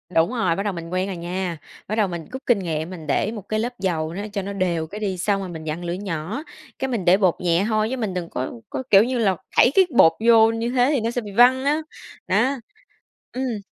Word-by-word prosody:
Đúng 165 +4 +4
rồi, 190 -9 +1
bắt 195 - -2
đầu 205 -2 -1
mình 165 -1 -7
quen 185 +2 -1
rồi 190 -3 -5
nha, 175 0 -3 0.3
bắt 215 - -2
đầu 210 -3 +2
mình 170 -3 -6
gút 260 +1 -7
kinh 235 -5 +3
nghiệm 160 -2 -3
mình 165 -4 -9
để 215 - +1
1 210 -5 -9
cái 215 0 0
lớp 245 +2 -4
dầu 165 -4 -1
nó 200 +3 -4
cho 200 - -1
nó 200 +1 -5
đều 170 -4 -1
cái 205 +5 -8
đi 195 -3 -2
xong 195 +2 0
rồi 190 - -5
mình 160 -2 -7
vặn 155 +3 -4
lửa 170 0 -2
nhỏ, 190 - -4 0.4
cái 265 - -1
mình 230 -8 -2
để 185 +2 +6
bột 185 -4 +2
nhẹ 175 +1 +2
hôi 215 0 +1
chứ 260 - -3
mình 215 -6 -2
đừng 175 -2 -4
có 130 - -4 0.2
có, - - -4
kiểu 200 +1 +7
như 250 +1 -1
là, 200 -5 +2 0.2
thảy 250 - +6
cái 385 - +6
bột 165 - +8
vô 225 -1 +6
như 225 +1 -2
thế 250 +1 +3
thì 260 - +1
nó 230 - -1
sẽ 245 0 -2
bị 205 -2 -8
văng 255 +5 +5
á, 300 +2 +2 0.5
đó, 270 +1 +2 0.7
ừm. 250 -3 -2
200 Hz, 265 wpm, -22 LUFS, 175-230 Hz, 0.7 s, bột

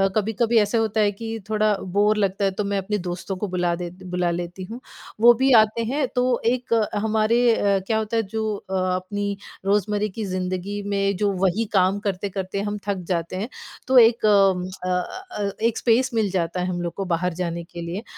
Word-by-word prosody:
कभी-कभी 225 +2 +1
ऐसा 210 +2 +1
होता 220 -1 +1
है 205 -1 +3
कि 225 +2 -6
थोड़ा 215 -1 +2 0.2
बोर 210 +1 +4
लगता 195 0 0
है 195 - +2
तो 205 +2 -3
मैं 200 0 -1
अपने 210 +2 -1
दोस्तों 180 +2 -4
को 210 - -3
बुला 180 -1 0
देती 180 +2 -8
बुला 180 -1 +1
लेती 175 +2 -5
हूँ। 240 - -6 0.4
वो 240 +1 +9
भी 265 +3 +2
आते 220 +2 +2
हैं 270 +2 0
तो 250 0 +2 0.2
एक 245 0 0 0.2
हमारे 220 +2 +2
अ, 200 -1 +2
क्या 220 - +1
होता 220 +1 -1
है 225 - +2
जो 215 +1 -2
अ, 190 -1 -6 0.2
अपनी 200 +2 -3 0.3
रोज़मर्रे 205 +1 +1
की 215 - -2
जिंदगी 185 +2 -3
में 200 -1 +1
जो 205 0 +1
वही 210 +5 +1
काम 190 +1 +3
करते-करते 195 -1 -3
हम 205 0 -3
थक 200 -1 0 0.2
जाते 170 +1 -3
हैं, 210 +7 -3 0.4
तो 260 0 +4
एक 230 -1 +6
उम, 195 -3 +4
अ 185 0 -6
अ 365 - -4
अ, 200 - -1
एक 230 0 +1
स्पेस 245 +2 +2
मिल 220 -3 +1
जाता 180 -1 -1
है 180 - -1
हम 175 -1 -2
लोग 170 -1 -3
को 195 - -4
बाहर 175 0 0
जाने 170 -1 -3
के 170 0 -9
लिए। 175 +6 -5
200 Hz, 210 wpm, -23 LUFS, 185-220 Hz, 0.4 s, वो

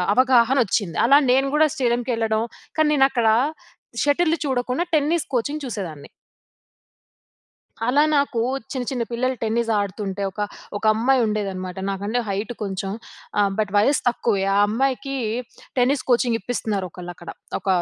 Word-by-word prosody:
అవగాహన 255 0 +4
వచ్చింది. 195 -4 -1
అలా 280 +3 +7
నేను 270 +2 +3
కూడా 310 +1 +5
స్టేడియంకి 245 -2 0
ఏళ్ళడం, 220 -1 +1 0.3
కానీ 310 -1 +4
నేను 270 -2 +5
అక్కడ 235 -3 +1 0.8
షటిల్ 315 +3 +3
చూడకుండా 255 +3 0
టెన్నిస్ 310 +2 +2
కోచింగ్ 285 +5 -1
చూసేదాన్ని. 185 - -6 1.8
అలా 280 +4 +4
నాకు 280 -4 +1 0.3
చిన్న, 255 -2 -3
చిన్న 245 -3 -1
పిల్లలు 255 +2 0
టెన్నిస్ 230 +1 0
ఆడుతుంటే 200 0 -3
ఒక, 210 - -6 0.4
ఒక 205 - -6
అమ్మాయి 250 +4 +2
ఉండేదనమాట. 195 -4 -3
నాకంటే 200 +5 -2
హైట్ 205 +4 -3
కొంచెం. 195 -1 -3 0.5
ఆహ్, 200 -1 +4
బట్ 210 -2 0
వయసు 265 +7 +3
తక్కువే. 225 -4 0
ఆ - - +3
అమ్మాయికి 270 +4 -1 0.6
టెన్నిస్ 255 +2 +2
కోచింగ్ 240 -1 +3
ఇప్పిస్తున్నారు, 210 -3 -2
ఒకళ్ళు 175 0 -8
అక్కడ. 175 - -11 0.3
ఒక - - -14
235 Hz, 140 wpm, -22 LUFS, 205-265 Hz, 1.8 s, అలా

